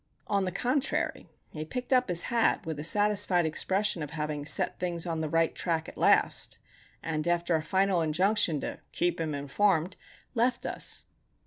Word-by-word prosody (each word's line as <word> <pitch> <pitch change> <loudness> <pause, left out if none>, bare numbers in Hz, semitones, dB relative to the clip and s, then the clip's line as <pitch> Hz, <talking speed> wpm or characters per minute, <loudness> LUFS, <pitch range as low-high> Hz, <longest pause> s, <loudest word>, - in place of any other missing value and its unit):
On 200 -2 0
the 185 - -2
contrary, 260 +8 -1 0.2
he 155 - -5
picked 250 - -3
up 250 -4 +3
his 175 -1 +3
hat 230 -3 +1
with 160 -2 -5
a - - -4
satisfied 205 -1 +3
expression 190 +3 +1
of 150 - -5
having 150 -1 -4
set - - +2
things 175 -2 -1
on 165 -2 -3
the 155 - -3
right 165 +1 +1
track, 165 -2 -2
at - - -10
last, - - +2 0.5
and 155 0 -3
after 175 0 +1
a 160 - 0
final 190 +1 +1
injunction 165 0 +2
"to - - -5
keep 175 -1 0
him 155 -2 -2
informed," 170 +5 0 0.4
left 245 0 0
us. - - -3
175 Hz, 175 wpm, -28 LUFS, 160-205 Hz, 0.5 s, up